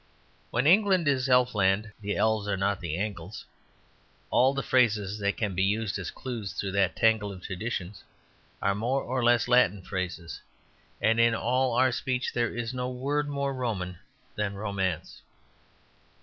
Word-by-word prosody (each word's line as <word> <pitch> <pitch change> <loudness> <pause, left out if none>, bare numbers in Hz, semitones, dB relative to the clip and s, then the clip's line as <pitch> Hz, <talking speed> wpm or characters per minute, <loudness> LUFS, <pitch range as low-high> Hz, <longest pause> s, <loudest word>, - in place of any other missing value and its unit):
When 120 +3 0
England 185 -1 +4
is 135 -2 +2
Elfland, 110 -5 +3
the 105 0 -2
elves 110 -2 +1
are 100 -1 0
not 95 0 0
the 85 -2 -3
Angles. 100 -2 -5 0.9
All 130 +2 +5
the 140 - -1
phrases 105 -5 +2
that 100 0 0
can 105 -3 -1
be 95 - -1
used 105 0 0
as 90 - -4
clues 115 -8 -6
through 95 +1 -3
that 95 -2 +1
tangle 110 -2 +2
of 95 -2 -10
traditions 95 -1 -5 0.6
are 100 - +3
more 120 +7 -1
or 130 0 -2
less 120 -1 +4
Latin 105 -6 +3
phrases. 90 -3 -5 0.6
And 115 +1 +2
in 115 0 +4
all 125 +2 +1
our 130 +1 +4
speech 125 +1 -2
there 120 -2 +1
was 120 +1 -4
no 125 0 -2
word 145 +4 -1
more 140 -1 -1
Roman 100 -9 -3 0.4
than 105 -1 -2
"romance." 95 -5 -3
110 Hz, 160 wpm, -28 LUFS, 95-125 Hz, 0.9 s, All